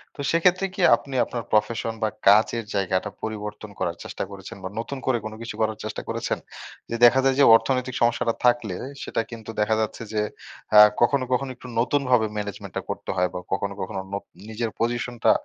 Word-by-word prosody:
তো - - -23
সেক্ষেত্রে 180 +3 +3
কি 190 - -3
আপনি 135 -1 -8
আপনার 120 -2 -5
প্রফেশন 110 +1 +1
বা 110 - +2 0.2
কাজের 110 +3 +5
জায়গাটা 95 -2 0
পরিবর্তন 105 -1 -5
করার - - -1
চেষ্টা - - -5
করেছেন? 95 -1 -9
বা 95 - -4
নতুন 135 +4 -4
করে 130 -2 +3
কোনো 110 0 -5
কিছু 115 - -6
করার 110 -1 0
চেষ্টা 110 - -4
করেছেন? - - -2 0.5
যে 115 - -2
দেখা 120 +3 +6
যায় 135 -1 +3
যে - - +7
অর্থনৈতিক 125 +1 0
সমস্যাটা 120 0 +2
থাকলে 120 -6 +2 0.3
সেটা - - -1
কিন্তু 115 -2 -9
দেখা 110 +1 +2
যাচ্ছে 110 +1 -3
যে 105 - +1 0.6
আ - - +12 0.2
কখনো, 130 +2 +3
কখনো 130 +2 0
একটু 125 - -12
নতুনভাবে 125 -2 +2
ম্যানেজমেন্টটা 100 -1 -5
করতে - - -5
হয় 90 0 +2
বা - - -2
কখনো, 100 +1 -1
কখনো 95 0 -4
নোপ 100 - -3 0.3
নিজের 110 +1 -2
পজিশনটা 120 +1 +1
115 Hz, 185 wpm, -24 LUFS, 105-125 Hz, 0.6 s, আ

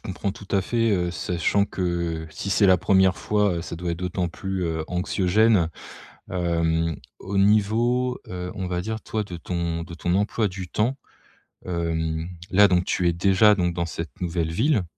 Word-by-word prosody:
comprends 95 +1 -3
tout 100 - -12
à 100 - +4
fait, 115 +2 +1
heu, 90 -3 +1
sachant 85 +4 0
que, 85 -4 -2
si 100 +5 -5
c'est 100 +1 +4
la 95 -1 +6
1re 95 +1 +3
fois, 105 -3 +1
heu, 85 - -3
ça - - -6
doit 85 +1 -3
être 85 - -5
d'autant 90 0 -2
plus 95 +2 -4
heu, 80 -1 -2
anxiogène. 95 +1 +2 0.6
Hem, 85 -2 0 0.2
au 100 +1 -4
niveau 115 +5 +2
heu, 90 0 -5
on 95 -3 -3
va 90 0 -2
dire, 110 +3 -4
toi 110 -1 -2
de 90 -4 -8
ton 85 -1 -3
de 85 0 -10
ton 90 +2 -1
emploi 105 +2 +1
du 95 -1 -6
temps. 120 +9 0 0.7
Hem, 80 -2 -2 0.2
là 100 +2 +6
donc 90 -1 +2
tu 90 -2 +1
es 85 - +2
déjà 100 +4 +5
donc 90 -2 0
dans 85 -1 -1
cette 85 +3 -7
nouvelle 85 -2 -1
ville? 115 - +2
90 Hz, 185 wpm, -24 LUFS, 85-100 Hz, 0.7 s, la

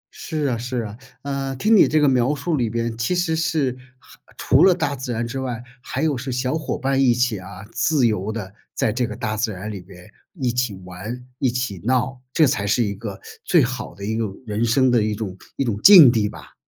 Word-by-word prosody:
是 155 -3 -3
啊 125 -4 0
是 125 0 -3
啊。 105 -1 -7 0.3
呃， 135 -1 -3
听 215 - +3
你 205 - +7
这 155 - +2
个 150 - +4
描 130 +2 +2
述 160 +2 -2
里 120 -5 0
边 115 0 -2
其 120 +11 0
实 175 -2 0
是 155 -5 0 0.2
还 - - -19 0.2
除 - - +4
了 185 -2 +6
大 145 -5 -1
自 130 -1 -5
然 115 0 -2
之 130 +3 -5
外， 125 -3 -4 0.2
还 - - -4
有 150 -3 +1
是 130 +1 -5
小 125 +3 -1
伙 160 - -3
伴 135 +1 -1
儿 - - +2
一 130 -3 +4
起 120 -5 0
啊， 95 +1 -10
自 150 -6 +2
由 105 -1 0
地 100 -3 -6 0.2
在 110 - +1
这 125 0 0
个 105 - -6
大 110 -3 -3
自 110 +1 -1
然 105 +2 -6
里 100 -3 -7
边 90 0 -15 0.3
一 130 -7 -1
起 125 -4 -1
玩、 110 +8 -7
一 130 - +2
起 120 -8 -3
闹。 125 +1 0
这 155 - +4
才 100 -5 0
是 120 +3 +2
一 100 -1 -2
个 100 -1 -7 0.2
最 170 -5 +4
好 130 +1 -4
的 100 0 -7
一 110 +1 -2
个 115 - 0 0.2
人 105 +1 -2
生 130 +2 +3
的 120 -2 +3
一 105 0 -1
种 100 -4 -5 0.2
一 - - 0
种 110 -5 -2
境 175 -11 +10
地 110 -3 +1
吧。 - - -13
125 Hz, 255 characters per minute, -22 LUFS, 110-135 Hz, 0.3 s, 境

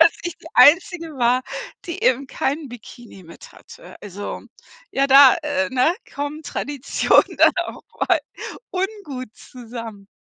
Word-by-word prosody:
dass 330 0 +7
ich 345 -1 -5
die - - -16
Einzige 335 0 +4
war, 245 +1 +2 0.4
die 340 - -6
eben 260 +2 +2
keinen 285 +1 -3
Bikini 235 -4 -13
mit 170 - -14
hatte. - - -15
Also 205 0 -7 0.5
ja, 275 +1 +2
da 270 -1 +8
äh, 285 -1 -1
ne, 260 +6 +2 0.2
kommen 290 +2 -5
Tradition 285 -2 +1
dann - - +6
auch - - -9 0.3
mal - - +3 0.5
ungut 365 - -5
zusammen. 230 -4 -10
275 Hz, 135 wpm, -21 LUFS, 240-320 Hz, 0.5 s, da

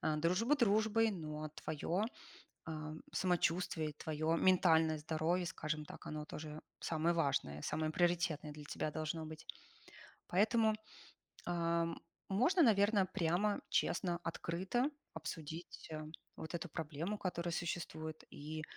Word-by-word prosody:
а, 155 - +1
дружба 185 - +3
дружбой, 220 -2 +4
но 155 -4 -4
твоё, 165 +6 -1 0.6
а, 155 -1 -4 0.2
самочувствие, 175 -3 +1
твоё 155 +2 0
ментальное 160 -4 +5
здоровье, 160 +4 +1
скажем 155 -1 -3
так, - - -10
оно 150 0 -4
тоже 155 0 -6 0.2
самое 165 +1 +1
важное, 135 - +1
самое 155 0 0
приоритетное 170 -3 +1
для 150 0 -9
тебя 150 +1 -2
должно 160 +1 -2
быть. 155 0 -8 0.8
Поэтому, 220 +3 +4 0.7
а, 170 -1 +2 0.4
можно, 320 - +4
наверное, 205 -4 +5
прямо, 185 +2 +1
честно, 175 -2 +1
открыто 190 - 0 0.2
обсудить, 160 +1 -6
а, 155 0 -4 0.3
вот 160 - -7
эту 170 -1 -3
проблему, 165 +6 -3
которая 175 -2 -2
существует. 160 -2 -3
И 155 +2 -5
165 Hz, 120 wpm, -37 LUFS, 155-185 Hz, 0.8 s, ментальное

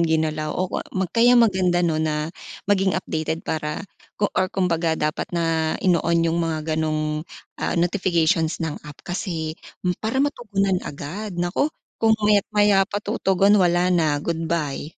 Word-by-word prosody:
ginalaw 155 -2 +1
o 185 - +1
kwa 185 - -3 0.2
ma 190 - +2
kaya 235 +6 +4
maganda, 185 -6 +3
'no, 155 -2 +1
na 155 0 -1 0.3
maging 195 -2 +2
updated 160 -3 -3
para 150 +4 -3 0.3
ko 205 - 0
or 185 - +1
kumbaga 170 -4 0
dapat 150 0 -2
na 165 -2 0
ino-on 170 -2 +3
yung 165 +1 +1
mga 160 -1 -2
ganong, 155 -1 -1 0.4
ah, - - -1
notifications 170 -2 +1
ng 155 -2 -4
app 150 -1 -11
kasi 170 -3 -3 0.3
hmm, 180 - +2
para 220 +4 -2
matugunan 200 -9 0
agad 175 +8 -6
naku, 175 +11 0 0.3
kung 220 -1 +4
maya't-maya 205 -1 +3
pa - - -3
tutugon 200 -2 +2
wala 180 0 +3
na 155 -4 +2
goodbye. 165 -3 -2
170 Hz, 150 wpm, -23 LUFS, 160-195 Hz, 0.4 s, kaya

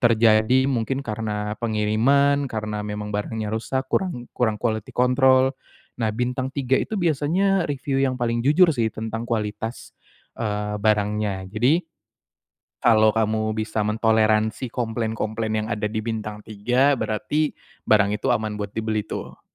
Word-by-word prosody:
terjadi. 115 +2 +4
Mungkin 130 +1 -1
karena 105 -1 -3
pengiriman, 120 +6 +2
karena 105 -2 -4
memang 105 0 -5
barangnya 105 +1 -3
rusak, 130 +4 -2
kurang 145 -9 -2
kurang 110 -3 0
quality 110 -3 -2
control. 130 +1 +4 0.5
Nah, 110 - +1
bintang 125 +3 -2
3 135 -2 0
itu 220 - -3
biasanya 175 +3 +1
review 135 -1 -1
yang 130 -2 +1
paling 120 -1 0
jujur 160 +5 +5
sih, 115 -3 +1
tentang 110 +1 -5
kualitas, 110 0 -3 0.4
eee, 105 -2 -2
barangnya. 105 -2 0
Jadi, 125 +9 +3 1.0
kalau 110 -2 +5
kamu 110 0 0
bisa 110 0 -2
mentoleransi 110 +1 +1
komplain-komplain 110 -1 -2
yang - - -6
ada 105 +1 -2
di 110 +1 -1
bintang 105 -1 -4
3, 125 +7 +1
berarti 145 +8 -1 0.3
barang 105 -1 +3
itu 130 +2 0
aman 110 -2 -1
buat 105 0 -5
dibeli, 110 -1 -2
tuh. - - -7
110 Hz, 135 wpm, -23 LUFS, 110-130 Hz, 1.0 s, jujur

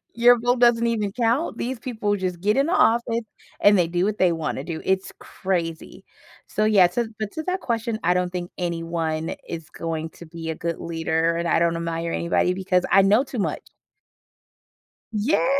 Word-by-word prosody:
Your 240 +1 +6
vote 245 +2 +1
doesn't 235 -1 +4
even 215 -4 -1
count. 240 +7 0
These 250 0 -3
people 220 -4 -2
just 185 -3 -3
get 210 +5 +2
in 275 - +3
the 335 - -1
office, 235 - +2 0.4
and 205 -1 +6
they 175 - +3
do 175 +1 0
what 210 +1 -1
they 180 -2 +4
wanna 160 -2 -3
do. 165 -2 -5
It's 190 0 0
crazy. 170 -4 -4 0.4
So 215 - -1
yeah. 200 -5 +6
So 235 -1 -1
but 215 -2 -4
to 315 - -4
that 370 +2 -1
question, 230 -5 -2
I 175 - +4
don't 180 0 0
think 175 -1 -5
anyone 165 -2 -2
is 165 -2 -7
going 160 -1 -4
to 170 - -13
be 165 0 -6
a - - -2
good 170 0 -3
leader, 165 0 0
and 170 0 -1
I - - +3
don't 170 0 +2
admire 165 0 -3
anybody 170 +1 +1
because 185 -1 0
I 195 - +6
know 210 +7 +4
too 265 -3 -7
much. 200 - -1 1.5
Yeah. 225 +6 +1
190 Hz, 190 wpm, -23 LUFS, 170-230 Hz, 1.5 s, Your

